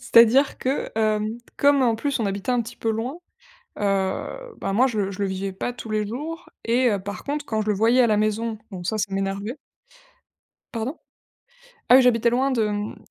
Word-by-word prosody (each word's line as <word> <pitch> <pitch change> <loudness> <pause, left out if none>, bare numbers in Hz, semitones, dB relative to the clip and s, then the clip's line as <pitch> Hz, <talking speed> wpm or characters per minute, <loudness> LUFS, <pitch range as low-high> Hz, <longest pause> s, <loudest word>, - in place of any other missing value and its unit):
C'est-à-dire 235 +5 +5
que, 265 +2 -2
hem, 215 0 +1 0.2
comme 280 -1 +5
en 235 -2 +3
plus 280 +2 -1
on 225 - 0
habitait 200 +4 -2
un 245 -1 +2
petit 225 - -10
peu 225 - -1
loin, 240 +9 -3 0.6
heu, 205 - -2
bah 195 - -2
moi, 255 +5 +4
je 230 - -4
le 195 -1 -1
je 190 - -9
le 200 - +1
vivais 190 +1 -3
pas 195 +6 -3
tous 230 -3 -8
les 210 -1 0
jours 315 +9 -6 0.2
et 245 +2 +3
heu, 205 -3 0
par 200 +2 -7
contre, 290 +1 -3
quand 220 -1 -1
je 215 - -5
le 210 - +2
voyais 230 +5 +4
à 240 - +4
la 210 -1 +3
maison, 215 +1 0
donc 180 -2 -6
ça, 220 - 0
ça 200 -2 -2
m'énervait. 195 +4 -2 1.2
Pardon? 230 +8 -3 0.9
Ah 250 - +9
oui, 265 - +7
j'habitais 235 -1 +4
loin 265 +3 +1
de, 225 -4 +1
mmh, 205 0 -3
225 Hz, 210 wpm, -24 LUFS, 205-255 Hz, 1.2 s, Ah